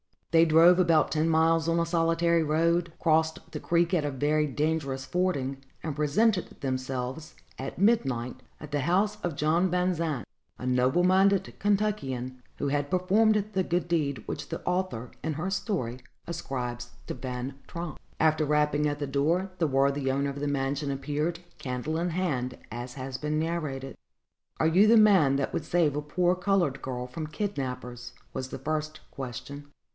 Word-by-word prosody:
They 165 0 +6
drove 165 +3 +6
about 165 -4 +4
ten 160 +1 +1
miles 165 0 +3
on 165 0 +2
a 170 - +2
solitary 165 0 +2
road, 165 +2 +1
crossed 160 -1 +1
the - - -5
creek 170 +1 +1
at 160 -5 +2
a - - 0
very 150 +3 +1
dangerous 145 -2 -1
fording, 160 -7 -1 0.3
and 155 -3 -3
presented 180 +8 +2
themselves, 130 +2 -3 0.2
at 135 - -5
midnight, 135 - +1 0.2
at 150 -1 -10
the 145 - 0
house 195 +9 +1
of 175 -4 -2
John 165 +6 +2
Van 180 +1 +1
Zandt, 155 - -2 0.3
a - - -7
noble 130 +6 +2
minded 190 +1 +3
Kentuckian, 140 - -1 0.2
who 140 - -1
had 145 0 -1
performed 205 +4 +3
the 190 - +2
good 175 0 -1
deed 140 -9 0
which 145 - -5
the - - -5
author, 180 -10 -2
in 160 - -2
her 170 +6 -3
story, 190 - -2 0.3
ascribes 125 -7 -4 0.2
to - - -3
Van 130 +2 -5
Tromp. 170 -2 -6 0.2
After 155 -1 +3
some 150 - -2
rapping 150 0 +2
at 145 0 -2
the 145 - -1
door, 165 +8 +1
the 165 - +3
worthy 135 0 +1
owner 140 +1 0
of 140 - -7
the 145 - -2
mansion 140 +1 -1
appeared, 150 +5 -2 0.2
candle 130 +5 -3
in 175 +1 0
hand, 135 -9 -1
as 120 +2 -6
has 130 -1 -5
been 150 0 -1
narrated. 155 -5 -3 0.6
"Are - - +2
you 185 +6 +5
the 230 +1 +7
man 190 -11 +6
that 135 0 -1
would 160 - -2
save 160 -5 +2
a 150 - -1
poor 175 +4 +1
colored 180 -6 +1
girl 125 -1 -4
from 155 +5 -6
kidnappers?" 125 - -4 0.2
was 130 0 -3
the - - -6
first 155 +2 -3
question. 140 +2 -7
155 Hz, 170 wpm, -28 LUFS, 135-175 Hz, 0.6 s, the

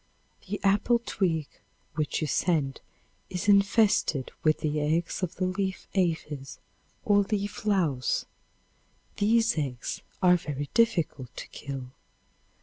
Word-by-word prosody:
The 205 - -2
apple 205 +4 +4
twig 165 -6 0 0.5
which 155 0 -1
you 155 - 0
send 150 -4 0 0.5
is 180 +1 -4
infested 200 - +3
with 155 -1 +2
the 150 -1 0
eggs 160 +5 0
of 180 -1 -2
the 185 - -1
leaf 190 +1 -2
aphis 155 -7 -1 0.5
or 205 -1 +5
leaf 205 +1 -2
louse. 165 -11 +1 0.9
These 225 -2 +3
eggs 130 -5 -3 0.2
are 180 -1 +7
very 145 -4 -5
difficult 170 - +1
to - - -6
kill. 135 -3 -7
175 Hz, 120 wpm, -28 LUFS, 150-200 Hz, 0.9 s, are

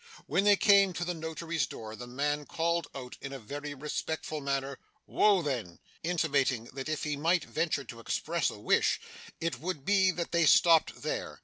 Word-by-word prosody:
When 195 - +1
they 205 0 +7
came 200 -2 +5
to 175 +1 -3
the 180 - -1
notary's 160 -2 -3
door, 110 -2 -8
the 120 +2 -8
man 145 +3 -2
called 170 -1 0
out 125 -2 -8
in 135 - -6
a 135 - -5
very 145 +5 -6
respectful 150 +2 -4
manner, 140 -1 -2 0.3
'Woa 200 -4 +3
then' 120 - -3 0.2
intimating 145 -8 +1
that 135 +2 -5
if 155 - -2
he 150 -1 -1
might 165 +5 +2
venture 155 -3 -1
to 115 -3 -10
express 160 +7 -1
a - - -8
wish, 105 - +2 0.4
it 165 0 -2
would 165 -5 -4
be 195 -2 +4
that 170 -2 -2
they 170 -2 +3
stopped 165 0 +5
there. - - -3
155 Hz, 185 wpm, -30 LUFS, 135-170 Hz, 0.4 s, they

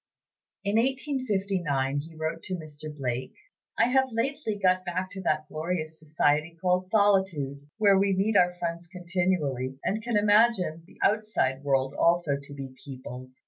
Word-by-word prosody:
In 200 +1 +1
1859 200 - 0
he 160 +3 -9
wrote 160 +1 -3
to 185 - -3
Mr. 155 -3 -9
Blake: 130 -3 -4 0.4
"I 230 - +5
have 265 +1 +3
lately 230 -1 -1
got 185 -2 +2
back 185 +1 -3
to 190 - -6
that 155 -4 0
glorious 155 0 -3
society 155 +1 +1
called 180 +1 +1
Solitude, 185 -9 +1
where 200 -3 +5
we 195 -1 +2
meet 205 +3 +1
our 180 -2 +4
friends 170 -1 -4
continually, 175 -8 -1
and 215 +3 -1
can 235 -1 0
imagine 205 -6 +3
the - - -19
outside 205 -11 +1
world 135 -1 +1
also 170 -4 +3
to 140 +1 -11
be 135 -2 -7
peopled. 130 -1 -9
175 Hz, 150 wpm, -27 LUFS, 145-200 Hz, 0.4 s, I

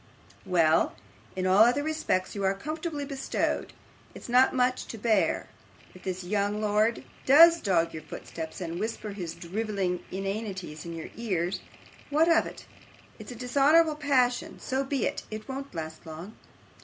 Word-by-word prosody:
Well. 165 -3 +3 0.4
In 185 0 -2
all 190 +3 +6
other 245 +5 +3
respects 310 -12 -1
you 200 - -4
are 190 0 +2
comfortably 310 - -4
bestowed. 275 -1 -2 0.4
It's - - -9
not 250 +2 +5
much 255 0 +1
to 225 - -7
bear. 215 -2 +1 0.5
If 185 - -14
this 185 -1 -3
young 205 +2 0
lord 215 +2 +1 0.2
does 330 +5 +8
dog 170 -4 +1
your 155 - -6
footsteps, 160 +2 -7
and 170 0 -4
whisper 215 0 -3
his 180 -5 -5
drivelling 190 -1 -2
inanities 195 -4 -4
in 170 - -5
your 165 - -7
ears, 185 -6 -1 0.5
what 305 +3 +3
of - - +2
it? - - -10 0.5
It's - - -9
a - - -7
dishonourable 285 +6 +4
passion. 265 -5 +1
So 265 +1 -1
be 270 -2 -1
it; - - -2
it 215 0 -7
won't 270 -4 -6
last 160 -1 -6
long. 165 +7 -8
215 Hz, 155 wpm, -28 LUFS, 185-265 Hz, 0.5 s, does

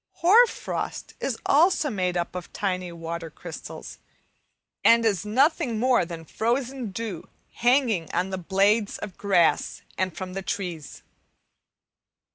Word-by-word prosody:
Hoar 445 +8 +7
frost - - -5
is 250 -4 -2
also 310 -1 +4
made 180 -4 -1
up 175 - -2
of 180 -1 -7
tiny 185 -3 -2
water 165 0 -6
crystals, - - -9 0.8
and 230 0 +6
is 210 -2 +1
nothing 270 +1 +2
more 250 -4 +3
than 165 -1 -8
frozen 245 - -2
dew 195 -3 -5 0.3
hanging 240 - +2
on 180 +2 -1
the 190 - -3
blades 200 +4 +2
of 205 -3 -7
grass 185 -5 +1 0.2
and 185 -2 -1
from 185 -1 -5
the 195 - -3
trees. 180 -7 -5
200 Hz, 130 wpm, -25 LUFS, 180-240 Hz, 0.8 s, Hoar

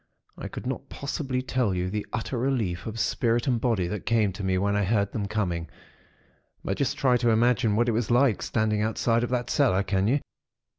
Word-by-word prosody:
I - - -6
could - - -8
not - - -4
possibly 135 -2 -3
tell 125 -6 0
you 90 0 -2
the 105 0 -3
utter 120 +3 -3
relief 115 -9 -1
of 110 +1 -5
spirit 115 +3 +1
and 125 -4 +1
body 110 -8 +1
that 105 +3 -5
came 110 -4 +2
to 100 +2 -7
me, 95 -1 +1
when 100 +2 +1
I 105 - +2
heard 100 0 +1
them 105 -3 -3
coming; 90 -6 -2 0.9
but 95 - -2
just 140 - -1
try 125 -2 +3
to 120 -1 +1
imagine 115 -1 +3
what 120 +2 +2
it - - +3
was 115 0 -1
like, 120 -2 +3
standing 110 -2 0
outside 115 +2 +1
of 120 - -1
that 125 -1 -1
cellar. 115 -9 +3
Can 95 0 0
you? 135 +6 +3
110 Hz, 210 wpm, -26 LUFS, 100-120 Hz, 0.9 s, try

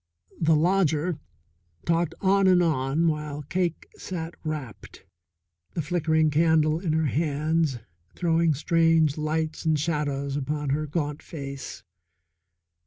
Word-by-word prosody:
The 160 -1 +4
lodger 165 -1 +1 0.7
talked 170 0 +1
on 195 0 +4
and 180 -1 +5
on 155 0 +1
while 150 -2 -2
Cake 170 +2 -2
sat 170 -2 -5
rapt, 150 - -7 0.7
the 165 - 0
flickering 160 -1 +1
candle 155 0 +3
in 170 -4 -1
her 160 0 +1
hands 155 0 0 0.4
throwing 165 -2 +2
strange 165 0 +3
lights 155 +1 -2
and 155 -2 +2
shadows 145 -3 -1
upon 145 0 -2
her 150 +2 -1
gaunt 150 -1 -3
face. 140 -3 -7
155 Hz, 115 wpm, -26 LUFS, 150-165 Hz, 0.7 s, and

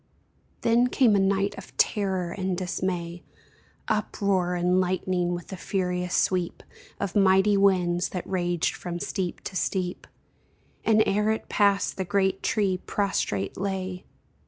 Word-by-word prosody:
Then 235 +2 +3
came 245 -4 +3
a - - +4
night 195 +1 +1
of 190 - -14
terror 190 -4 +1
and 190 -1 -2
dismay, 175 -2 -3 0.7
Uproar 200 -4 0
and 180 +1 +2
lightning, 180 -1 0
with 175 - -8
the 190 - -5
furious 180 -1 -2
sweep 180 -2 0 0.4
Of 195 - -3
mighty 195 +1 +4
winds, 180 -3 +2
that 180 - -5
raged 175 -3 0
from 175 -1 -5
steep 180 0 -3
to 190 - -7
steep, 185 -1 -2 0.8
And 220 -1 +4
ere 210 +2 +1
it 220 - -2
passed 200 -2 +2
the 190 - -1
great 190 +1 0
tree 195 -4 +1
prostrate 105 - -1
lay 190 -1 -3
190 Hz, 135 wpm, -26 LUFS, 180-200 Hz, 0.8 s, a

